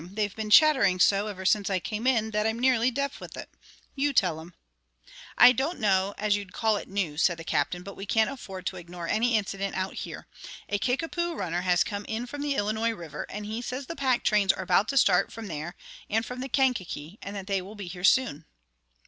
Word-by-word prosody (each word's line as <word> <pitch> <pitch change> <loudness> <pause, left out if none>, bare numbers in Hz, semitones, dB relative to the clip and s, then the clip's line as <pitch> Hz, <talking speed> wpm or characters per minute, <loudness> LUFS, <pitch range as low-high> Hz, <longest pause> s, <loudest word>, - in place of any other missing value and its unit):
They've 205 -1 -2
been 220 -1 -4
chattering 210 -9 +6
so 200 +3 +4
ever 190 -3 -6
since 200 +1 +2
I 190 - +1
came 215 +6 -3
in 225 -4 +2
that 210 0 +1
I'm 220 +1 -1
nearly 250 -1 +3
deaf 280 +3 -3
with - - -10
it. - - -8 0.4
You 285 +1 0
tell 175 -9 +2
'em." 170 +2 -13 0.8
"I 245 - +9
don't 270 +8 -2
know 195 -2 +2
as 210 -1 +2
you'd 200 -3 -6
call 220 -1 +1
it - - -8
news," 180 -6 -2
said 175 -2 +3
the 165 - -8
Captain; 160 +3 -1
"but 200 +1 -9
we 195 - -8
can't 220 +1 +3
afford 195 -9 -8
to 185 - -3
ignore 175 0 -7
any 230 +3 +2
incident 195 -1 -3
out 190 0 -2
here. - - -7 0.4
A 205 - 0
Kickapoo 330 - -1
runner 175 - -2
has 180 -1 +3
come 205 -1 -5
in 225 +2 -3
from 285 +3 -7
the 290 -1 -1
Illinois 220 +2 0
River, 165 -6 -7
and 210 +1 -6
he 220 +3 -4
says 255 +2 -5
the 330 - -6
pack 260 -4 +1
trains 205 -3 +4
are - - -5
about 205 - +3
to 275 - -1
start 190 -6 +4
from 225 0 -8
there 170 -1 -6 0.3
and 225 +2 +1
from 250 +2 -7
the 265 +1 -5
Kankakee, 215 - -1
and 200 +1 -7
that 195 -2 -5
they 195 -1 0
will 195 +4 -10
be 205 -2 -7
here 180 0 -8
soon." 195 - +3
210 Hz, 225 wpm, -27 LUFS, 185-245 Hz, 0.8 s, I